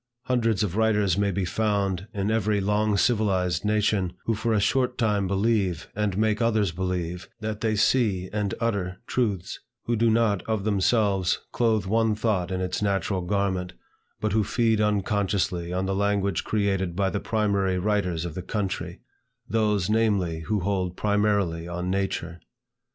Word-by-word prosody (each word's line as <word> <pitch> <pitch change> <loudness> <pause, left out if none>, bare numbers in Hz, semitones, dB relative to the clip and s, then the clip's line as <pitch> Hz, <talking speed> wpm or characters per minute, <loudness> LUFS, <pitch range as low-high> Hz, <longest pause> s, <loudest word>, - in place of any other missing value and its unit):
Hundreds 115 -5 +1
of 95 -3 -2
writers 105 -4 +2
may 100 +1 +1
be 95 0 -1
found 100 -1 -1
in 100 +1 -1
every 105 -2 +1
long 105 +1 +1
civilized 95 -6 +1
nation, 105 -3 +1
who 115 - +1
for 115 +2 -1
a 110 - +3
short 125 +4 +1
time 105 -4 +1
believe, 100 -3 0
and 105 -2 -1
make 110 +1 +1
others 110 -5 +2
believe, 90 0 -3
that 110 -1 -4
they 110 -1 +1
see 105 -4 +2
and 105 -2 -1
utter 100 -6 -1
truths, 105 -10 -1 0.2
who 120 - 0
do 115 +1 +3
not 110 -4 +2
of 110 -3 0
themselves 100 -2 +2
clothe 110 -4 +1
one 110 +2 +2
thought 105 -5 0
in 95 -1 -2
its 90 +1 -2
natural 100 -1 0
garment, 95 -1 -1 0.5
but 110 - -1
who 110 0 +3
feed 110 +1 +1
unconsciously 100 -4 0
on 95 +1 -1
the 95 - -1
language 100 -2 0
created 95 -4 0
by 100 +1 +1
the 100 - -1
primary 100 -4 0
writers 90 -4 0
of 85 - -5
the 90 - -5
country, 100 +1 -3 0.5
those, 105 -4 +1
namely, 105 -7 +1
who 105 -2 0
hold 90 -1 -1
primarily 100 -5 +1
on 90 +1 -3
nature. 95 -3 -2
100 Hz, 160 wpm, -25 LUFS, 95-110 Hz, 0.5 s, a